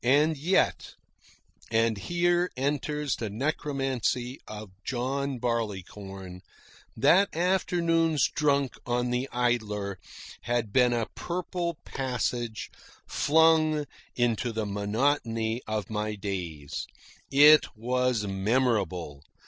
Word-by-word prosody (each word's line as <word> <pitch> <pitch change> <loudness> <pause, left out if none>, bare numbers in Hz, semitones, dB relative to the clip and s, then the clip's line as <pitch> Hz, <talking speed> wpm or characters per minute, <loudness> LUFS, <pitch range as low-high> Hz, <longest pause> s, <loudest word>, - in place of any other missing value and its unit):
And 145 +6 +4
yet 165 +7 +1 0.7
and 115 0 +2
here 175 - +1
enters 145 +1 -1
the 110 - -3
necromancy 130 0 -1
of 105 -2 -8
John 135 +2 -2
Barleycorn 100 -5 -4 0.6
that 175 - +5
afternoon's 165 -3 +2
drunk 140 -3 +1
on 125 0 -1
the 125 +2 -1
Idler 105 -6 -1 0.4
had 120 -3 -1
been 125 -2 +5
a 115 -2 0
purple 175 -1 -3
passage 120 -3 -3 0.4
flung 155 -1 +3 0.3
into 120 0 +1
the 110 -1 -2
monotony 115 +2 0
of 110 -3 -2
my 105 0 -2
days. 90 -8 -5 0.4
It 150 +2 +8
was 125 0 0
memorable. 95 - 0
125 Hz, 95 wpm, -28 LUFS, 110-145 Hz, 0.7 s, It